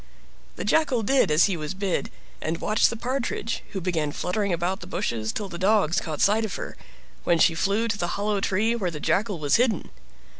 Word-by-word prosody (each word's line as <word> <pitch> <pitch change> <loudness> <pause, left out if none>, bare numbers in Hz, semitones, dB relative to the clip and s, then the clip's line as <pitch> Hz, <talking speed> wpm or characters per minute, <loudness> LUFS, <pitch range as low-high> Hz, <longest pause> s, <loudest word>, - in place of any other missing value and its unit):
The - - -5
Jackal 275 -8 +2
did 265 0 +3
as 155 +2 +5
he 195 - 0
was 155 +1 -5
bid, 195 -2 -1 0.3
and 160 +1 -2
watched 215 0 +3
the 230 - -4
Partridge, 240 -2 -2
who 195 - -2
began 165 -5 -1
fluttering 200 +6 -1
about 175 +3 -1
the - - -9
bushes 115 - -2
till 205 - -4
the 175 -2 -8
dogs 190 -4 +3
caught 155 -2 -4
sight 215 +3 +4
of 220 - -3
her, - - -6 0.5
when 175 - +3
she 165 - +5
flew 200 +7 +1
to 215 -2 -2
the 175 - 0
hollow 205 0 0
tree 215 +5 +1
where 195 -6 -1
the 155 -3 -6
Jackal 200 +4 0
was 145 -2 +2
hidden. 230 -6 +1
195 Hz, 210 wpm, -25 LUFS, 170-220 Hz, 0.5 s, as